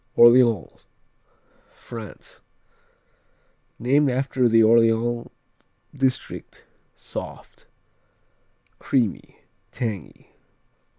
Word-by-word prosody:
Orléans 120 -4 +4 0.9
France 115 -4 -12 1.4
Named 140 +4 +2
after 130 -1 0
the 115 0 +5
Orléans 115 +1 +2 0.7
district 130 -2 -3 0.3
Soft; - - -9 1.1
creamy; 120 -8 -2 0.3
tangy. 110 -8 -6
120 Hz, 55 wpm, -23 LUFS, 115-130 Hz, 1.4 s, the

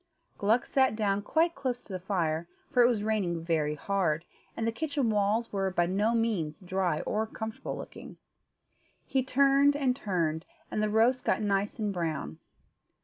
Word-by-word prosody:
Gluck 220 +4 +2
sat 265 -4 +2
down 205 -2 +1
quite 325 +10 +2
close 255 -4 -3
to 195 - -10
the 185 - -3
fire, 170 -4 -1 0.2
for 250 - +4
it 240 - +7
was 225 -4 0
raining 190 -6 -1
very 155 -3 +1
hard, 170 -1 0 0.3
and 225 - -1
the 230 - +1
kitchen 280 -1 -1
walls 210 +3 +1
were 195 -1 0
by 175 -2 +1
no 205 +6 +1
means 200 -10 -1
dry 185 -3 -1
or 220 +1 -1
comfortable 220 0 -5
looking. - - -10 0.9
He 265 - +1
turned 275 +2 +4
and 265 -3 +1
turned, 170 - -1 0.2
and 215 - -1
the 215 - +1
roast 230 +4 +3
got 220 - +1
nice 200 0 0
and 210 -3 -1
brown. 155 - -3
210 Hz, 170 wpm, -29 LUFS, 180-235 Hz, 0.9 s, it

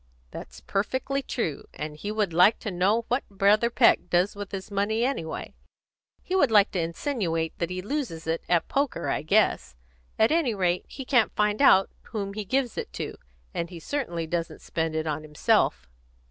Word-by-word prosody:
That's - - -9
perfectly 260 +7 -1
true. 170 - -3
And 150 0 -5
he 205 +7 -5
would 210 -5 -1
like 180 +6 +5
to 215 - -3
know 200 +6 +1
what 250 +3 0
Brother 205 +3 +3
Peck 230 -5 +4
does 180 +4 +2
with 205 -1 -7
his 195 +1 -6
money, 215 +4 +1
anyway. 210 -12 -3 0.7
He 370 - -2
would 320 -9 +4
like 210 -2 +5
to 185 - -2
insinuate 165 - -2
that 170 - -1
he 180 0 -4
loses 215 - -3
it 165 +1 -1
at 175 -2 +2
poker, 280 -1 -1
I - - 0
guess; 160 - +2 0.4
at 220 - +4
any 310 -9 +2
rate, 180 -2 0
he 270 - -8
can't 245 -4 +2
find 210 +3 +1
out 195 -9 +6
whom 200 -3 -4
he 210 0 -5
gives 260 +3 0
it - - -6
to, - - -4 0.4
and 170 - -3
he 175 -2 -9
certainly 175 - -3
doesn't 165 +1 -3
spend 160 -1 -2
it 160 0 -1
on 155 -1 -2
himself." 150 - +1
200 Hz, 185 wpm, -26 LUFS, 170-235 Hz, 0.7 s, out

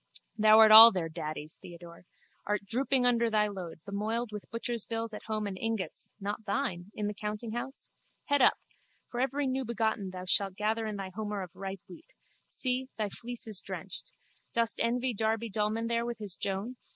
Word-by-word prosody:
Thou 215 0 +6
art 220 -1 +8
all 225 +2 +12
their 175 -5 -2
daddies, 155 -1 -6
Theodore. 170 0 -12 0.4
Art 210 0 -1
drooping 255 +3 +1
under 235 -1 +3
thy 210 -1 +2
load, 180 -6 -7
bemoiled 215 +3 -2
with 210 -1 -8
butcher's 230 -1 -3
bills 225 -1 -4
at 210 - -8
home 215 -1 -2
and 200 -2 -4
ingots 225 -7 -3
(not 205 +2 -4
thine!) 180 -2 -2
in 210 - -2
the 210 - -2
countinghouse? 220 +5 -5 0.4
Head 285 -1 +2
up! - - +6 0.5
For 245 - -4
every 270 +2 0
newbegotten 235 -6 -1
thou 185 0 -7
shalt 195 0 +2
gather 215 +2 -1
thy 195 -2 -5
homer 210 -1 -3
of 180 - -10
ripe 195 -1 -6
wheat. 175 -3 -13 0.4
See, 255 0 0
thy 215 -2 -1
fleece 240 +3 -6
is 215 -4 +2
drenched. - - -7 0.4
Dost 230 -1 +2
envy 245 +2 +1
Darby 220 +1 -1
Dullman 215 +2 0
there 235 0 0
with 240 -1 -4
his 205 -4 -5
Joan? 200 +6 -4
215 Hz, 175 wpm, -30 LUFS, 195-235 Hz, 0.5 s, all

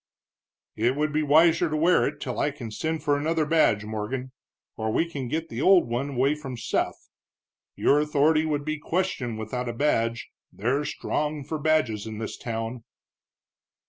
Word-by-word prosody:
"It 120 +4 +1
would 150 +1 -1
be 155 - +2
wiser 160 +3 +4
to 155 - -1
wear 170 +4 +4
it 145 0 -5
till - - -4
I - - +2
can 135 -6 -8
send 160 +8 -3
for 145 - +2
another 155 +2 0
badge, 145 -10 +3
Morgan, 110 +5 -4 0.4
or 110 0 -2
we 165 - +1
can 140 -6 -5
get 160 +5 -3
the 120 - -4
old 185 -4 +5
one 120 +4 -2
away 135 +4 +3
from 135 -5 -7
Seth. 115 - -2 0.7
Your 145 - +3
authority 150 +1 +3
would 150 -2 -1
be 155 0 -2
questioned 150 -10 -2
without 120 +3 -4
a - - -3
badge, 115 -3 0 0.2
they're 130 +8 -1
strong 150 0 -2
for 155 +3 -4
badges 135 -9 +1
in 110 -1 -6
this 110 0 -5
town." 115 0 -5
145 Hz, 175 wpm, -26 LUFS, 115-155 Hz, 0.7 s, old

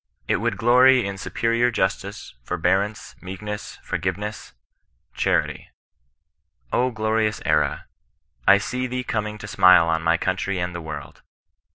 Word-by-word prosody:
It - - +2
would - - -1
glory 125 +1 +5
in 100 0 -5
superior 115 +5 +1
justice, 95 -5 -3
forbearance, 95 - -1
meekness, 105 +3 -7
forgiveness 105 +1 -4 0.3
— - - -48
charity, - - 0 1.0
O 125 +1 +2
glorious 110 -1 0
era, - - +1 0.6
I 100 - +8
see 125 +5 -3
thee 125 0 -3
coming 105 -2 -3
to 105 - -9
smile 90 -4 +6
on 80 -1 +1
my 85 +1 +2
country 95 +1 -2
and 90 0 -2
the 85 - -5
world. 80 - -8
105 Hz, 135 wpm, -23 LUFS, 90-115 Hz, 1.0 s, I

